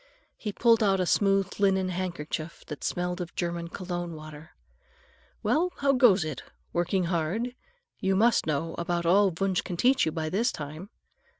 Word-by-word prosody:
He 210 - -4
pulled 230 +2 +4
out 195 -2 +3
a 185 - +1
smooth 195 +1 +2
linen 190 -2 +2
handkerchief 170 -3 -4
that 150 - -8
smelled 180 +1 -2
of 175 - -7
German 170 -1 -2
cologne 175 -1 -5
water. 155 +1 -11 0.9
"Well, 350 +4 +2
how 280 -1 +2
goes 215 -9 +5
it? 155 -4 -5 0.3
Working 175 +2 +1
hard? 175 +8 -1 0.5
You 190 -1 +1
must 225 0 +3
know 160 +2 -1
about 170 0 -1
all 195 +4 +5
Wunsch 190 +1 0
can 175 - -5
teach 260 0 +3
you - - +1
by 160 0 -3
this 210 +9 +1
time." 155 +6 -7
180 Hz, 165 wpm, -28 LUFS, 170-200 Hz, 0.9 s, goes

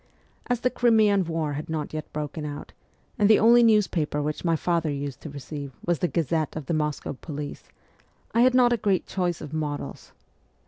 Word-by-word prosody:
As 245 -1 0
the 250 - +1
Crimean 215 -6 +3
war 160 -3 -2
had 150 +3 -5
not 155 -2 -3
yet 155 0 -5
broken 150 +1 -4
out, 145 0 -7 0.5
and 205 0 +4
the 220 - +7
only 235 +2 +6
newspaper 200 -10 +2
which 150 +1 -3
my 165 -2 +2
father 170 -1 0
used 140 -2 -4
to 155 - -7
receive 140 -1 -7
was 175 -2 +1
the 180 - +1
Gazette 160 -2 -1
of 155 -3 -5
the 165 - -2
Moscow 150 -2 -2
Police, 145 +1 -7 0.7
I 230 - +4
had 255 +1 +5
not 245 -1 +5
a - - +1
great 200 -4 +1
choice 175 -3 -2
of 150 -1 -8
models. 150 -2 -4
160 Hz, 190 wpm, -25 LUFS, 150-205 Hz, 0.7 s, the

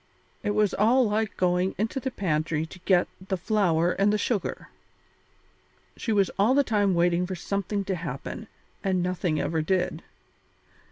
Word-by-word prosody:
It 205 -1 -1
was 210 -2 +2
all 235 +4 +4
like 215 0 -1
going 180 +1 +1
into 225 +6 -1
the 265 - -2
pantry 155 -7 -1
to 165 - -12
get 180 -2 +4 0.2
the 190 - -1
flour 175 -4 +2
and 200 +2 +2
the 210 - +2
sugar. 205 -3 -2 1.3
She 225 - -3
was 200 -3 +2
all 225 +6 +4
the 285 - +5
time 205 -6 +2
waiting 175 +1 +2
for 190 - -4
something 200 +2 -2
to 195 - -1
happen, 165 - -5 0.4
and 185 -3 +1
nothing 180 -3 -1
ever 160 -1 0
did. 180 +3 0
190 Hz, 160 wpm, -26 LUFS, 175-210 Hz, 1.3 s, the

